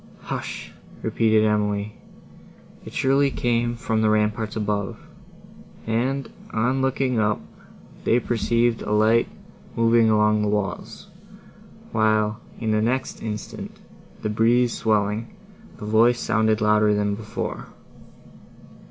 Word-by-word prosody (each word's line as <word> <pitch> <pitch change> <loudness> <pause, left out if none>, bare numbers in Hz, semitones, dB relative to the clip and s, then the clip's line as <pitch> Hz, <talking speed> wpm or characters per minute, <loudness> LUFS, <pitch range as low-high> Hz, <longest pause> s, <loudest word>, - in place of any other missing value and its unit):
"Hush!" - - -6 0.3
repeated 110 -1 +3
Emily. 105 -1 0 0.9
"It - - -8
surely 140 +1 +3
came 120 -2 0
from 110 -1 -1
the 110 - +3
ramparts 105 0 0
above:" 105 -2 -2 0.9
and, 130 +5 -1 0.2
on 125 +4 +1
looking 130 -2 0
up, 105 -1 +1 0.6
they 120 - +3
perceived 120 0 +1
a 105 - -2
light 110 +2 +4 0.5
moving 115 0 +4
along 105 0 +3
the 105 - 0
walls, 105 -1 -3 0.9
while, 110 0 +1 0.2
in 110 -2 -1
the 110 0 +2
next 130 +4 -1
instant, 105 -2 -6 0.5
the 105 - 0
breeze 115 +3 +3
swelling, 105 +1 0 0.4
the - - -8
voice 115 +3 +4
sounded 110 0 +1
louder 105 0 +4
than 105 0 0
before. 105 +1 -5
110 Hz, 115 wpm, -23 LUFS, 105-120 Hz, 0.9 s, light